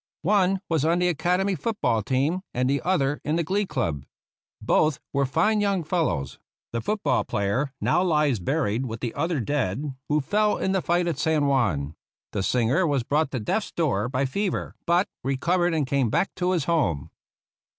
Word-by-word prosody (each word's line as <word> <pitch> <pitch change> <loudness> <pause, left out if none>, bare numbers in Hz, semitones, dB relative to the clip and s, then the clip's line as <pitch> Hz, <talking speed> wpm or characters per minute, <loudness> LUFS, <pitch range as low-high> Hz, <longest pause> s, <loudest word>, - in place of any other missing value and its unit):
One 195 0 +2
was 160 -4 +1
on 165 +2 +3
the 180 0 +2
Academy 180 +4 +1
foot 210 +7 -3
ball 110 -1 +2
team 140 - 0
and 125 +1 +1
the 140 +1 +1
other 150 -6 0
in 150 - 0
the 170 - +1
glee 195 +5 0
club. 75 - -2 0.6
Both 155 -1 +2
were 140 -1 +1
fine 210 +10 +2
young 200 -4 +1
fellows. 150 - -1 0.3
The 115 - -1
foot 210 - -2
ball - - +2
player 100 +8 -1
now - - +2
lies 150 - +2
buried 125 - -1
with 115 -1 -6
the 120 -3 -3
other 165 -3 -1
dead 135 +2 -1 0.2
who 150 +1 +3
fell 210 +8 +1
in 190 - -1
the 190 -1 +1
fight 175 +1 +1
at 165 -5 -2
San 155 -1 +2
Juan. 100 - +1 0.4
The 100 - -2
singer 125 - +2
was 140 -4 +1
brought 150 +4 +1
to 130 - -3
death's 195 - -2
door 125 - 0
by 130 +1 0
fever, 195 +8 -2
but 175 +3 +3 0.2
recovered 170 +6 +1
and 150 -3 +1
came 130 -3 +1
back 195 - 0
to 180 0 +1
his 170 -5 +1
home. 140 - 0
150 Hz, 190 wpm, -25 LUFS, 130-180 Hz, 0.6 s, on